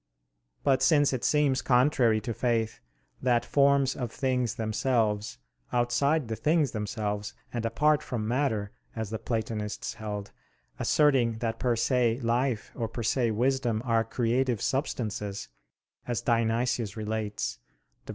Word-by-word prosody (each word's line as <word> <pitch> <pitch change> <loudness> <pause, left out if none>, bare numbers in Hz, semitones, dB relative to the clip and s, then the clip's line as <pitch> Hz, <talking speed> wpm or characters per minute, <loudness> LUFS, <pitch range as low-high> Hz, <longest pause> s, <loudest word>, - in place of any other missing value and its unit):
But 135 -2 +3
since 145 +1 +4
it 130 - -2
seems 145 -3 +2
contrary 125 -3 +3
to 120 0 -3
faith 115 -2 0 0.4
that 120 -2 +2
forms 140 -2 +3
of 120 -3 -4
things 125 -3 0
themselves, 110 -1 0 0.3
outside 125 +4 +1
the 110 - -3
things 150 0 +2
themselves 105 -1 -3 0.2
and 120 -2 -2
apart 150 +6 +2
from 110 -4 -3
matter, 110 -5 0 0.2
as 110 -2 -4
the 110 - -3
Platonists 110 -3 -3
held, 105 -2 -6 0.5
asserting 135 -6 +3
that 115 0 -3
per 125 -2 +1
se 120 0 +2
life 120 0 0
or 115 -3 -3
per 115 +1 -5
se 120 0 +1
wisdom 120 0 0
are 115 -2 +2
creative 120 +1 0
substances, 105 -7 -2 0.6
as 120 -2 -1
Dionysius 115 -2 0
relates 105 - -3 0.5
(Div. - - -16
120 Hz, 130 wpm, -28 LUFS, 110-130 Hz, 0.6 s, since